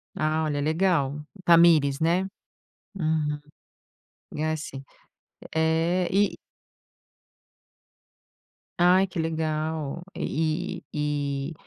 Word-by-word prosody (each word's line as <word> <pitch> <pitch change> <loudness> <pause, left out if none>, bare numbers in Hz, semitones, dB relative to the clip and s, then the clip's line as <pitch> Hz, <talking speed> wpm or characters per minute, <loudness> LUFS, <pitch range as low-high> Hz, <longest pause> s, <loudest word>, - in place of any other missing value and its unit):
Ah, 155 +1 0
olha 145 -2 -1
legal. 155 -3 +1 0.2
Thamires, 165 -5 +5
né? 170 +3 +2 0.7
Uhum. 155 -4 0 1.0
E 150 - -2
assim. 155 -4 -3 0.7
É, 165 +3 +2
e 200 +1 +2 2.4
Ai, 180 +2 +5
que 175 - -6
legal. 160 -1 -2
E 165 +3 -2
e 145 0 -2
160 Hz, 75 wpm, -26 LUFS, 150-170 Hz, 2.4 s, Thamires